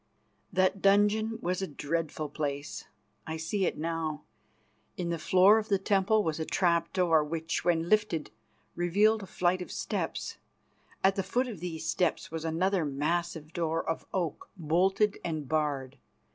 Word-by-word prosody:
That 185 0 +2
dungeon 210 +3 +3
was 180 +2 -1
a 190 - -1
dreadful 155 +1 -3
place. 145 -1 -4 0.4
I 160 0 -3
see 185 +4 0
it - - -2
now. 160 -1 -3 0.7
In 175 -1 -2
the 170 -1 -2
floor 190 +6 +6
of 220 +1 -6
the 200 - +4
temple 200 +2 +2
was 160 -1 -2
a - - 0
trap 170 0 +1
door, 170 -5 +3
which, 165 +2 -3
when 170 -1 +2
lifted, 210 -6 +1 0.4
revealed 205 +6 +3
a 195 - -8
flight 180 +1 +1
of 180 - -7
steps. - - -3 0.7
At 190 0 +4
the - - +2
foot 250 +6 0
of 220 -8 -7
these 165 -2 -5
steps 180 - 0
was 160 -1 -4
another 175 +3 +1
massive 155 +2 -2
door 165 -1 -1
of 165 - -3
oak, 175 -6 -3
bolted 190 +6 +2
and 155 -4 -3
barred. 140 -3 -1
170 Hz, 160 wpm, -30 LUFS, 160-195 Hz, 0.7 s, floor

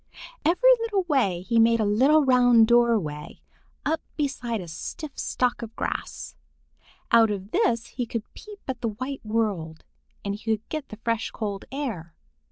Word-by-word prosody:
Every 365 +11 +5
little 435 -4 0
way 255 - +1
he 230 +3 +2
made 230 0 +5
a 215 - +2
little 270 +9 +4
round 245 -3 +6
doorway 220 -11 +1 0.5
up 320 +2 0 0.2
beside 255 -6 -2
a 180 - -7
stiff 285 - -6
stalk 250 -1 0
of 225 -1 -8
grass. 65 - -4 0.8
Out 230 -1 +6
of 200 0 -4
this 245 - +1
he 245 0 -5
could 230 -1 -3
peep 420 -2 -12
at 255 -3 -4
the 235 - 0
white 255 +6 -5
world, 205 -8 -2 0.4
and 200 - -1
he 210 - -8 0.2
could 215 - -31
get 310 -3 -4
the 215 - -9
fresh 230 -2 0
cold 205 -3 -5
air. 225 - -5
230 Hz, 165 wpm, -25 LUFS, 210-275 Hz, 0.8 s, round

